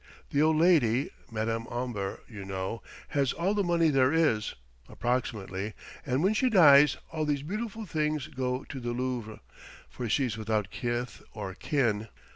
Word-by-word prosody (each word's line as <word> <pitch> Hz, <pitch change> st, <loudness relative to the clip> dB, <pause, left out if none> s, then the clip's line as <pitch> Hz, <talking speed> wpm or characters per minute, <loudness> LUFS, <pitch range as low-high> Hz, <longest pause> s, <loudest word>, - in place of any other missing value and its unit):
The 145 Hz, -, +2 dB
old 155 Hz, +1 st, +4 dB
lady 150 Hz, -7 st, +4 dB, 0.2 s
Madame 115 Hz, +1 st, -2 dB
Omber, 120 Hz, -6 st, -3 dB
you 105 Hz, -4 st, -8 dB
know 95 Hz, +3 st, -4 dB, 0.3 s
has 140 Hz, -3 st, +1 dB
all 180 Hz, +5 st, 0 dB
the 205 Hz, -1 st, +1 dB
money 170 Hz, -2 st, +3 dB
there 135 Hz, -2 st, +4 dB
is, 150 Hz, -10 st, +2 dB, 0.3 s
approximately, 110 Hz, -4 st, -2 dB, 0.3 s
and 130 Hz, +2 st, 0 dB
when 195 Hz, +3 st, +4 dB
she 255 Hz, +4 st, +2 dB
dies 150 Hz, -, +7 dB
all 155 Hz, -1 st, -2 dB
these 145 Hz, -2 st, 0 dB
beautiful 215 Hz, +5 st, -4 dB
things 155 Hz, -4 st, -1 dB
go 130 Hz, -3 st, -3 dB
to 135 Hz, -, -7 dB
the 120 Hz, -1 st, -3 dB
Louvre; 120 Hz, -3 st, -3 dB, 0.5 s
for 120 Hz, -3 st, -4 dB
she's 120 Hz, -2 st, 0 dB
without 110 Hz, -2 st, -1 dB
kith 120 Hz, 0 st, -3 dB
or 100 Hz, -3 st, -5 dB
kin." 115 Hz, -4 st, 0 dB
130 Hz, 155 wpm, -29 LUFS, 110-155 Hz, 0.5 s, dies